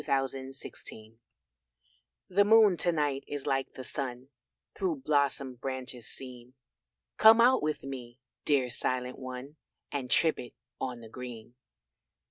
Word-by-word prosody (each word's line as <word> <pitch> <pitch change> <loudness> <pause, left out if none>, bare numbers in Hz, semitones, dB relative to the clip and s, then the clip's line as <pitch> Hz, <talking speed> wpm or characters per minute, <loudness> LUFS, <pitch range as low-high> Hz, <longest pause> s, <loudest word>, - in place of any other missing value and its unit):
THE - - -13
SILENT 135 0 -1 0.3
ONE 110 +1 -13 1.1
The 195 +2 +4
moon 215 -2 +6
to 175 - +3
night 145 -4 0
is 145 -2 -5
like 135 0 -1
the 130 - -7
sun 130 -1 -5 0.4
Through 320 -8 -2
blossomed 140 -4 +1
branches 130 -3 -5
seen; 125 -1 -11 0.6
Come 220 +1 +8
out 255 +2 +6
with 155 0 -2
me, 125 -3 -7 0.3
dear 135 -4 +2
silent 125 +1 -1
one, 130 +3 -7 0.3
And 135 -3 -3
trip 160 +3 +3
it 120 - -9 0.2
on 125 -2 -4
the 115 - -10
green. 120 -1 -8
135 Hz, 135 wpm, -30 LUFS, 125-150 Hz, 1.1 s, Come